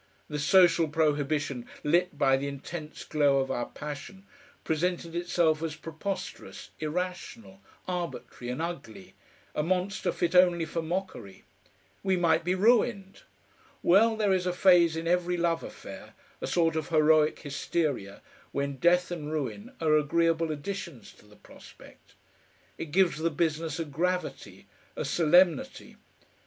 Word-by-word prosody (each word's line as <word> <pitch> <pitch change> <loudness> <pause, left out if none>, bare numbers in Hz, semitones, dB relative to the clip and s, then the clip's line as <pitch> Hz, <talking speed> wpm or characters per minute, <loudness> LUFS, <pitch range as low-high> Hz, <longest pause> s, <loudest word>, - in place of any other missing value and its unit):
The 150 -1 -3
social 170 +1 +5
prohibition 145 -4 0 0.2
lit 170 +1 +1
by 135 -2 +4
the 135 +1 -2
intense 150 +3 -7
glow 145 -3 +2
of 135 0 0
our 120 -2 -2
passion, 150 +7 -8 0.4
presented 170 +1 -1
itself 170 -2 +1
as 160 -2 -3
preposterous, 180 +4 -6
irrational, 180 +5 -5 0.3
arbitrary, 175 -8 -5
and 150 +6 -3
ugly, 140 - -7 0.4
a - - 0
monster 185 +4 -1
fit 175 -1 -1
only 175 -2 +5
for 165 +1 -3
mockery. 160 - -5 0.6
We 190 -1 +1
might 170 -1 +2
be 180 +2 0
ruined! 205 -1 +2 0.6
Well, 220 +6 +5
there 210 -3 +2
is 185 -1 0
a 180 - 0
phase 175 -3 +5
in 165 +1 -4
every 180 0 +1
love 170 -1 +1
affair, - - -10 0.3
a - - -3
sort 165 -2 +1
of 155 -2 -3
heroic 155 -1 +4
hysteria, 145 -7 -3 0.3
when 140 -1 -2
death 180 +5 +3
and 155 -3 -5
ruin 160 - -4
are 155 -2 +3
agreeable 165 +2 +2
additions 150 - -6
to - - -21
the 105 - -18
prospect. - - -17 0.6
It - - -3
gives 175 -1 +2
the 165 +1 +1
business 160 0 -1
a 165 - -2
gravity, 175 +4 -3 0.3
a - - -3
solemnity. 170 0 +2
165 Hz, 140 wpm, -28 LUFS, 150-180 Hz, 0.6 s, social